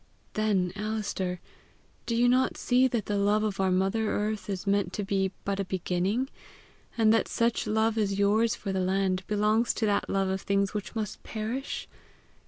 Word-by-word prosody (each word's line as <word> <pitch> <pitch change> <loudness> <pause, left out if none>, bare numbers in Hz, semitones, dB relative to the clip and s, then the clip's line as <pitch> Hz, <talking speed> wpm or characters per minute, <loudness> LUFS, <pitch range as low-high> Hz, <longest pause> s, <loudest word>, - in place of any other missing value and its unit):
"Then, 195 -4 +1
Alister, 205 -4 -2 0.7
do 235 - 0
you 240 +1 +4
not 255 +1 +2
see 255 +1 +3
that 235 -4 -2
the 205 -1 -1
love 205 +2 +2
of 205 -3 -2
our 190 -1 +2
mother 195 +4 +1
earth 210 0 -2
is 195 -1 -3
meant 200 0 +1
to 205 - -2
be 195 -1 0
but 200 0 -1
a - - +1
beginning; 190 +6 -1 0.7
and 220 -1 +5
that 225 - +2
such 230 -1 0
love 220 +1 +1
as 200 -2 0
yours 210 +3 +3
for 195 -2 -4
the 190 - 0
land 185 0 +1
belongs 215 +2 +2
to 220 - 0
that 205 -1 +1
love 195 -1 +1
of 190 0 -1
things 200 0 0
which 210 +1 -5
must 215 -2 -4
perish? 230 +5 -4
205 Hz, 185 wpm, -28 LUFS, 195-220 Hz, 0.7 s, and